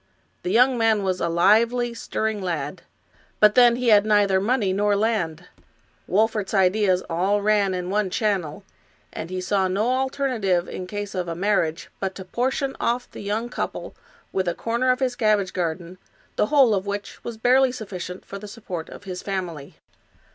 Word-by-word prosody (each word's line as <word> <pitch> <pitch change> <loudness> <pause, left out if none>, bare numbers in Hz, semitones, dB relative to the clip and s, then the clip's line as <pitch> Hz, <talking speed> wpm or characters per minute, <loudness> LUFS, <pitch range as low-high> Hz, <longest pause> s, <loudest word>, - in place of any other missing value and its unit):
The - - -3
young 245 +4 +4
man 220 -2 +3
was 185 -1 -1
a 170 - 0
lively, 230 +8 +3
stirring 220 -2 -3
lad, 165 -3 -3 0.6
but 210 0 +6
then 240 -1 +6
he 245 -1 0
had 205 -2 +6
neither 205 -3 +3
money 210 -3 +1
nor 205 +1 +2
land. 195 -6 -1 0.6
Wolfert's 215 0 +1
ideas 190 -1 +3
all 190 +5 0
ran 205 -3 +2
in 180 0 -4
one 205 -1 +1
channel, 190 -4 -1 0.5
and 160 - -6
he 185 0 -3
saw 190 +1 +1
no 205 +6 0
alternative 255 -9 0
in 180 - -6
case 205 +1 -5
of 180 -2 -3
a 165 - -3
marriage 175 -3 0
but 190 -1 -3
to 190 - -8
portion 265 +6 -1
ofif 240 +1 -1
the - - -9
young 210 +3 -2
couple 240 - -5 0.4
with 190 -1 0
a 175 - 0
corner 235 +3 -1
of 255 +1 +2
his 255 -2 0
cabbage 210 -5 +1
garden, 175 0 -3 0.4
the - - +1
whole 270 -5 +5
of 195 0 -1
which 200 0 -5
was 235 -2 -6
barely 255 +3 +4
sufficient 190 -6 -7
for 200 - -8
the 210 - -9
support 200 -6 -7
of - - -11
his 185 -2 -6
family. 175 -7 -5
205 Hz, 175 wpm, -23 LUFS, 185-230 Hz, 0.6 s, but